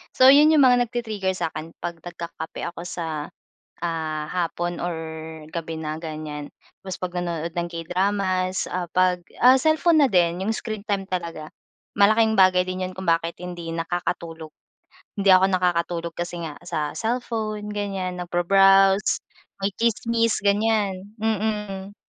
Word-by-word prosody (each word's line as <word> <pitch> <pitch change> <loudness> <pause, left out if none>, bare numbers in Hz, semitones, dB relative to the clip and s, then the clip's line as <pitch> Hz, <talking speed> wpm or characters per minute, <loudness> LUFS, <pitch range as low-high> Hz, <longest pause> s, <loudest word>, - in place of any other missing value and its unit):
so 260 +1 +8
'yon 290 +2 +7
'yong 310 -2 +6
mga 245 -1 +5
nagti-trigger 215 -5 -2
sa'kin 160 -1 -5
'pag 170 -1 -4
nagkakape 170 -1 -7
ako 175 0 -8
sa, 160 -4 -4 0.5
ah, 160 -2 -2
hapon, 175 0 -2
or 175 0 -2 0.6
gabi 165 -1 -5
na 155 0 -3
ganiyan, 155 -2 -6 0.3
tapos 190 -1 -6
'pag 180 -1 -4
nanonood 170 -2 -3
ng 175 0 -1
K-dramas, 185 +2 -1
ah, 180 0 -2
'pag 180 -1 +2 0.2
ah, 255 +1 +8
cellphone 315 +2 +4
na 270 - +3
din 175 0 +2
'yong 220 - +1
screen 215 -2 -5
time 200 -3 -2
talaga, 170 -4 -4 0.5
malaking 220 +2 +4
bagay 185 -1 +5
din 185 0 -2
'yon 185 - -5
kung 185 -1 -7
bakit 165 +1 +1
hindi 175 -2 -6
nakakatulog, 165 -1 -4 0.7
hindi 200 - -2
ako 185 +1 +5
nakakatulog 170 -2 0
kasi 175 0 -4
nga 150 - -7
sa 150 -1 -3
cellphone, 220 -3 -2
ganiyan 195 -3 -3
nagbro-browse 195 +3 +4 0.4
may 195 0 -1
tsimis, 230 0 +1
ganiyan, 205 0 0
mm. 210 -2 -2
185 Hz, 140 wpm, -24 LUFS, 170-210 Hz, 0.7 s, so